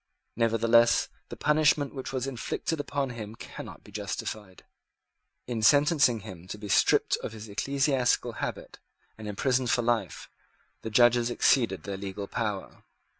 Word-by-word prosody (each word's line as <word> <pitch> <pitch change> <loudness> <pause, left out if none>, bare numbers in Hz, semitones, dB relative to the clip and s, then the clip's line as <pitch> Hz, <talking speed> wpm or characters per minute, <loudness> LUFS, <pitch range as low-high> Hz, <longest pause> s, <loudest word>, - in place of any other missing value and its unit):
Nevertheless 115 +1 +3 0.2
the - - -7
punishment 150 -2 +2
which 130 -2 -6
was 130 -1 -2
inflicted 135 +4 -3
upon 140 -2 -2
him 110 -2 -7
cannot - - -10
be - - -15
justified. 100 -4 -6 0.8
In 120 -3 -3
sentencing 145 -2 +4
him 90 -4 -10
to 105 - -6
be 105 -1 -8
stripped - - +3
of - - -6
his 110 0 -9
ecclesiastical 135 +4 +1
habit - - -5 0.4
and 110 -1 -9
imprisoned 125 +4 0
for 125 -2 +2
life, 120 -1 -1 0.5
the 110 - -5
judges 120 +1 +4
exceeded 115 - +2
their 100 -1 -5
legal 100 +1 -5
power. 105 -1 -4
115 Hz, 140 wpm, -28 LUFS, 105-135 Hz, 0.8 s, sentencing